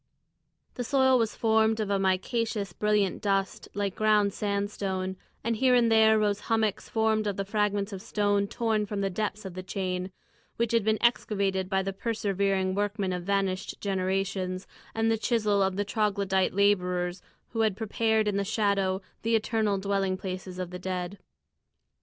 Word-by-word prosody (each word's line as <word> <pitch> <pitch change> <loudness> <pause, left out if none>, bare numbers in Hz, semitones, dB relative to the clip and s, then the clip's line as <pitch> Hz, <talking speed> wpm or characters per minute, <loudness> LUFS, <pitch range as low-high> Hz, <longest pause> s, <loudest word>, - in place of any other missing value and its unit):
The 245 - -4
soil 260 0 +4
was 225 -2 0
formed 220 0 +2
of 210 -2 -1
a 200 - +2
micaceous, 200 +1 0
brilliant 210 -2 +1
dust 195 -2 -1
like 200 -2 -1
ground 210 -2 +3
sandstone, 200 -2 -2 0.3
and 230 0 0
here 255 +1 +4
and 235 -2 +4
there 220 0 +6
rose 205 -1 +1
hummocks 220 -3 0
formed 220 -1 +1
of 200 - -2
the 195 - -2
fragments 205 0 0
of 190 - -6
stone 205 -2 +1
torn 220 -2 0
from 200 0 -3
the 195 -1 0
depths 210 +1 -3
of 190 - -6
the 185 - -5
chain, 185 0 -3 0.4
which 235 -1 0
had 230 -2 +3
been 220 +1 +2
excavated 195 -5 +1
by 190 -1 +1
the 195 0 -3
persevering 195 -3 0
workmen 205 -1 -1
of 180 -1 -4
vanished 195 -1 -1
generations, 190 -1 -1 0.3
and 225 0 +2
the 225 - +1
chisel 215 -4 +1
of 190 -1 +1
the 205 +1 -1
Troglodyte 200 -3 0
labourers 180 -3 +1 0.3
who 225 - -5
had 215 -3 +1
prepared 220 0 +1
in 205 -1 +1
the 200 - +1
shadow 200 -2 0 0.2
the 230 +1 +2
eternal 220 -2 +1
dwelling 195 -1 0
places 185 -1 -6
of 180 -1 -4
the 180 - -6
dead. 180 +1 -4
200 Hz, 170 wpm, -28 LUFS, 190-220 Hz, 0.4 s, there